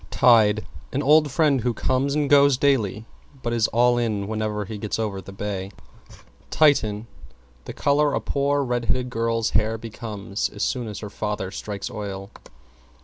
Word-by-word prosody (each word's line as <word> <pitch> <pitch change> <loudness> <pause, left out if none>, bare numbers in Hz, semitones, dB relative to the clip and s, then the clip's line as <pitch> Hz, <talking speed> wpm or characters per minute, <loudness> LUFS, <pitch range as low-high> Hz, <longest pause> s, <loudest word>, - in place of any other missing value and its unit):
=TIDE= 110 -3 +4 0.3
An 140 +2 -1
old 150 +1 +5
friend 140 -1 +2
who 120 0 -1
comes 130 +5 0
and 150 -1 +1
goes 140 -2 +5
daily 115 -6 +1 0.4
but 120 - -1
is 115 -2 +2
all 120 +1 +3
in 105 -4 -1
whenever 110 -1 -2
he 105 +1 -7
gets 105 0 -3
over 105 -3 -3
the 95 - -11
bay. 95 -1 -4 0.8
=TITIAN= 115 -9 +2 0.6
The - - -7
color 145 +1 +2
a - - +1
poor 140 0 0
red 120 -2 -2
headed 125 +1 -1
girl's 115 -1 0
hair 110 +2 +1
becomes 110 -3 -5
as 100 - -5
soon 125 -3 -1
as 105 -1 -7
her 105 -2 -7
father 105 -3 -3
strikes 100 0 -5
oil. 100 -1 -6
115 Hz, 165 wpm, -23 LUFS, 105-130 Hz, 0.8 s, old